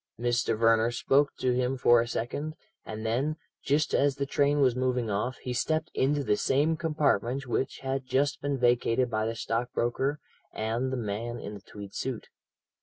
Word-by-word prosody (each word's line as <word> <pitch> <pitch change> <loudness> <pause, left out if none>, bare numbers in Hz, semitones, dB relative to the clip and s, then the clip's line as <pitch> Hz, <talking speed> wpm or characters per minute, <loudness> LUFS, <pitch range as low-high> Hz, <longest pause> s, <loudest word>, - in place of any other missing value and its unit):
Mr. 120 -2 +1
Verner 115 0 +4
spoke 135 +4 +2
to 125 - +1
him 125 +1 0
for 120 -1 +5
a 120 - -3
second, 145 +7 -3 0.3
and 110 0 -6
then, 130 +7 0 0.3
just 145 +2 +1
as 140 -1 +3
the 140 0 -2
train 145 +1 +2
was 130 -4 +4
moving 125 -3 0
off, 110 +5 -1
he 125 - -3
stepped 155 +6 0
into 145 +2 +1
the 105 - +2
same 145 +8 +2
compartment 140 -5 0
which 130 +1 -2
had 135 -1 -3
just 135 +2 +1
been 145 -1 -1
vacated 120 0 +2
by 110 0 0
the 115 - -3
stockbroker 120 +4 -1 0.3
and 115 +4 -2
the 130 - -1
man 115 +2 -3
in 105 - -6
the 100 - -9
tweed 100 0 -10
suit. 130 -4 -4
125 Hz, 180 wpm, -28 LUFS, 115-140 Hz, 0.3 s, for